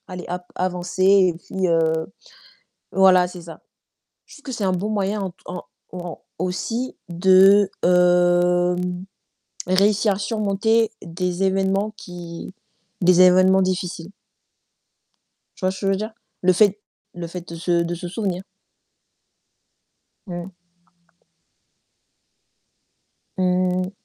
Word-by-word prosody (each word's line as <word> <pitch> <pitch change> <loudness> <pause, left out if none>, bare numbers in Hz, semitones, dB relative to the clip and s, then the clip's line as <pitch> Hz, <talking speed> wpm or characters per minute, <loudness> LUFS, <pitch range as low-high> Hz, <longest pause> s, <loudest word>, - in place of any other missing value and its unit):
allez 180 -1 -7
hop, 180 0 -4
avancer 180 0 -2
et 190 -3 +5
puis, 185 +2 -3
heu 160 -1 +1 0.9
voilà, 185 -2 +5
c'est 180 -1 -10
ça. 165 -1 -11 0.7
Je - - -15
trouve 295 - -17
que 265 - -6
c'est 220 -4 -3
un 185 - +1
bon 195 +4 -2
moyen 205 0 -1
ent 185 -2 -4
en 180 0 -6 0.3
au 180 - -6
en 175 -2 -8 0.2
aussi 225 +8 -3
de, 190 +3 +5 0.2
hem, 180 0 +2 0.6
réussir 200 +2 +3
à 190 - -6
surmonter 215 +1 +1
des 180 +2 -3
événements 195 +2 0
qui 175 -1 -9 0.5
des 180 0 +5
événements 185 +1 +5
difficiles. 185 -1 -3 1.5
Tu - - -8
vois 185 - +3
ce 190 - -8
que 195 - -3
je 195 - +3
veux - - +1
dire? 215 +2 -5 0.3
Le 185 0 +4
fait 205 +2 +3 0.4
le 175 -1 -6
fait 175 +1 -8
de 170 - -7
se 170 0 +1
de 170 +1 -3
se 175 +1 -7
souvenir. 190 -2 -3 1.8
Mmh. 175 0 -6 2.9
Mmh. 185 0 0
185 Hz, 125 wpm, -22 LUFS, 175-195 Hz, 2.9 s, et